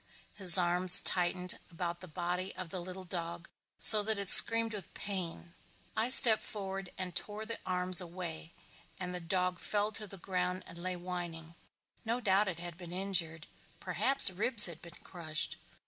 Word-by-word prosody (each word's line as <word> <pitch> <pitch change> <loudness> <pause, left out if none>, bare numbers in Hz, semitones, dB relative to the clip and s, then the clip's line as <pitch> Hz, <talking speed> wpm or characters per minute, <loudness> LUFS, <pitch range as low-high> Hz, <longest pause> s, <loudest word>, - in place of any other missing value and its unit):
His 185 -4 +5
arms 180 +1 +7
tightened 180 0 -1
about 170 0 -8
the 185 - -14
body 180 +3 -7
of 180 -3 -10
the 185 - -7
little 185 +1 -11
dog 170 -1 -8 0.3
so 215 -1 +7
that 215 +1 -2
it 200 -1 -4
screamed 230 -1 +5
with 205 -2 -9
pain. 175 -3 -8 0.4
I 225 +3 -2
stepped 235 -4 +6
forward 195 -2 -9
and 180 -2 -7
tore 210 +1 -5
the 230 +1 -8
arms 180 0 +6
away 170 -2 -10 0.5
and 180 -1 -8
the 180 - -7
dog 180 +1 -5
fell 210 0 -4
to 215 -1 -6
the 195 - -13
ground 180 0 -6
and 170 - -12
lay 185 +1 -7
whining. 175 -2 -10 0.5
No 230 +2 -5
doubt 205 -2 -1
it 180 - -7
had 175 0 -10
been 175 -2 -13
injured. 175 -4 -4 0.3
Perhaps 270 -7 0
ribs 215 +3 +6
had 170 -3 -8
been 170 -1 -15
crushed. 160 -4 -7
180 Hz, 170 wpm, -29 LUFS, 175-200 Hz, 0.5 s, arms